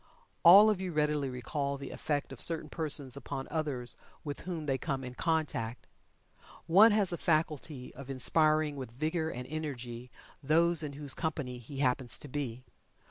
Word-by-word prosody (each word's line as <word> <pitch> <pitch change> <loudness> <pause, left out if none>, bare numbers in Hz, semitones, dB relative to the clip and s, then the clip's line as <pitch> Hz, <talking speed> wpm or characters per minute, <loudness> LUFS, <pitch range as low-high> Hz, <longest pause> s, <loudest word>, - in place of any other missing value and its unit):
All 200 +5 +9
of 195 -3 -2
you 185 -1 -3
readily 150 -2 +1
recall 140 +3 -3
the 140 0 -8
effect 145 -2 -2
of - - -9
certain 165 -2 +4
persons 145 -5 -1
upon 135 0 -6
others 140 -7 -2 0.3
with 145 -2 -5
whom 165 -4 -4
they 135 -2 0
come 135 -3 -3
in 125 -1 -7
contact. 150 -7 -2 0.8
One 200 +7 +7
has 205 -4 +2
a 170 - -4
faculty 155 -4 -1
of 140 0 -11
inspiring 155 +2 +3
with 130 -3 -6
vigor 160 +6 -2
and 125 -4 -6
energy 125 -6 -6 0.3
those 165 +3 +3
in 150 -2 -5
whose 145 -1 -1
company 145 -6 -3
he 135 +4 -10
happens 125 -2 +1
to - - -8
be. 130 -3 -4
145 Hz, 165 wpm, -31 LUFS, 130-160 Hz, 0.8 s, All